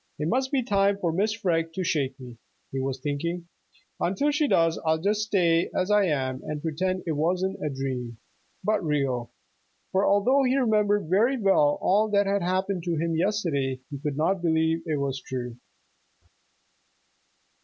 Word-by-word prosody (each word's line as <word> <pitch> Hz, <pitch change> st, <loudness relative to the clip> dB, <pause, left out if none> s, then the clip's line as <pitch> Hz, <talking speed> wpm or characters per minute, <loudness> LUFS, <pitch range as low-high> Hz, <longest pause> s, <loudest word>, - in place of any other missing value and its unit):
"It 150 Hz, -, -2 dB
must 260 Hz, +4 st, 0 dB
be 270 Hz, -3 st, +1 dB
time 200 Hz, -3 st, +2 dB
for 170 Hz, -5 st, -1 dB
Mrs. 215 Hz, +5 st, 0 dB
Freg 165 Hz, -3 st, 0 dB
to 185 Hz, -, -2 dB
shake 140 Hz, -5 st, -1 dB
me," 125 Hz, -2 st, -10 dB, 0.3 s
he 135 Hz, -, -3 dB
was 135 Hz, 0 st, -2 dB
thinking. 170 Hz, +5 st, -3 dB, 0.5 s
"Until 195 Hz, +12 st, +1 dB
she 295 Hz, 0 st, +1 dB
does 165 Hz, -8 st, +2 dB
I'll 160 Hz, -1 st, +2 dB
just 205 Hz, +6 st, 0 dB
stay 175 Hz, -6 st, +2 dB
as 185 Hz, +2 st, 0 dB
I 210 Hz, -1 st, +4 dB
am 130 Hz, -5 st, -1 dB
and 150 Hz, -1 st, -5 dB
pretend 185 Hz, +4 st, -1 dB
it 165 Hz, -, -1 dB
wasn't 180 Hz, +5 st, -1 dB
a 150 Hz, -, 0 dB
dream, 130 Hz, -4 st, -4 dB, 0.5 s
but 210 Hz, 0 st, +1 dB
real." 135 Hz, -6 st, -1 dB, 0.6 s
For 190 Hz, +1 st, +2 dB
although 245 Hz, +8 st, +4 dB
he 260 Hz, 0 st, +2 dB
remembered 210 Hz, -5 st, +2 dB
very 225 Hz, +10 st, +3 dB
well 190 Hz, -8 st, +3 dB
all 210 Hz, +3 st, +3 dB
that 200 Hz, -1 st, +3 dB
had 200 Hz, 0 st, +1 dB
happened 185 Hz, +1 st, -1 dB
to 170 Hz, -1 st, 0 dB
him 165 Hz, +1 st, -1 dB
yesterday, 160 Hz, -8 st, 0 dB
he 140 Hz, -, -5 dB
could 145 Hz, -1 st, -3 dB
not 180 Hz, +4 st, +1 dB
believe 160 Hz, -1 st, +1 dB
it 155 Hz, -2 st, 0 dB
was 135 Hz, -1 st, -2 dB
true. 125 Hz, -2 st, -5 dB
170 Hz, 170 wpm, -26 LUFS, 145-200 Hz, 0.6 s, I